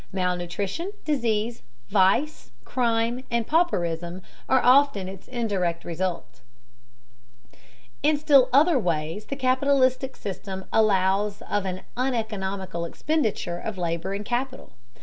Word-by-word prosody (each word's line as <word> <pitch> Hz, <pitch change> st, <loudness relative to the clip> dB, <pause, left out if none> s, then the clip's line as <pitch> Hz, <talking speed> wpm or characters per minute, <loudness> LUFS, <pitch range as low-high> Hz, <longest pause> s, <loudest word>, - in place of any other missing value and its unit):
Malnutrition, 185 Hz, -, -2 dB
disease, 235 Hz, -6 st, 0 dB, 0.3 s
vice, 205 Hz, -, +2 dB, 0.2 s
crime, 235 Hz, 0 st, 0 dB
and 235 Hz, -1 st, 0 dB
pauperism 175 Hz, -, 0 dB, 0.3 s
are 260 Hz, -, +5 dB
often 255 Hz, -7 st, +4 dB
its 190 Hz, 0 st, -9 dB
indirect 195 Hz, -9 st, -2 dB
results. 175 Hz, -4 st, -4 dB, 1.6 s
In 300 Hz, +1 st, +3 dB
still 285 Hz, -3 st, +5 dB
other 290 Hz, +2 st, +5 dB
ways 165 Hz, +1 st, -2 dB
the 275 Hz, -, -4 dB
capitalistic 260 Hz, 0 st, +2 dB
system 190 Hz, 0 st, -6 dB
allows 200 Hz, -1 st, +2 dB
of 205 Hz, -2 st, -1 dB
an 185 Hz, 0 st, -4 dB
uneconomical 205 Hz, -8 st, -2 dB
expenditure 210 Hz, -, -1 dB
of 215 Hz, 0 st, -5 dB
labor 170 Hz, +2 st, -2 dB
and 205 Hz, +1 st, -5 dB
capital. 255 Hz, +3 st, -3 dB
210 Hz, 110 wpm, -25 LUFS, 185-260 Hz, 1.6 s, are